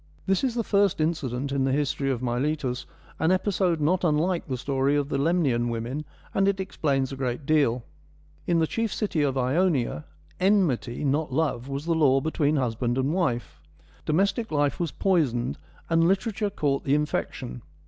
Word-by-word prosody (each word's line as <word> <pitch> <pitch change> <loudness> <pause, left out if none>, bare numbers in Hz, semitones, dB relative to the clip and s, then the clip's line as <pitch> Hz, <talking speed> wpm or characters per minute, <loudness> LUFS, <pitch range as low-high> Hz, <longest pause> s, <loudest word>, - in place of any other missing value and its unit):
This 195 +4 +1
is 255 -3 0
the 235 - 0
first 200 -4 +2
incident 140 -4 -1
in 140 -1 +1
the 135 - +1
history 140 0 0
of 130 -2 -2
Miletus, 130 +1 -1 0.3
an 160 +2 +3
episode 185 -3 +1
not 175 +5 +1
unlike 170 +3 +1
the 130 -3 -2
story 135 +2 0
of 145 -1 0
the 140 - -1
Lemnian 140 -7 +2
women, 120 +6 -3 0.3
and 195 0 +2
it 200 -1 +1
explains 140 -8 -1
a - - -4
great 130 0 -3
deal. 140 -6 +2 0.6
In 170 - +3
the 165 - +3
chief 225 +5 -2
city 200 -8 -1
of 140 -2 +1
Ionia, 130 - +1 0.3
enmity, 160 - +1
not 145 +2 0
love, 135 -4 -1
was 140 +2 -4
the 170 - +1
law 140 -4 +4
between 150 +1 0
husband 120 -2 0
and 135 +3 +1
wife. 120 - -1 0.4
Domestic 195 +7 +1
life 145 -1 +1
was 170 -2 0
poisoned, 135 -11 0 0.3
and 165 0 +3
literature 205 +2 0
caught 145 -8 -1
the 140 - +2
infection. 145 - -2
145 Hz, 170 wpm, -26 LUFS, 130-175 Hz, 0.6 s, law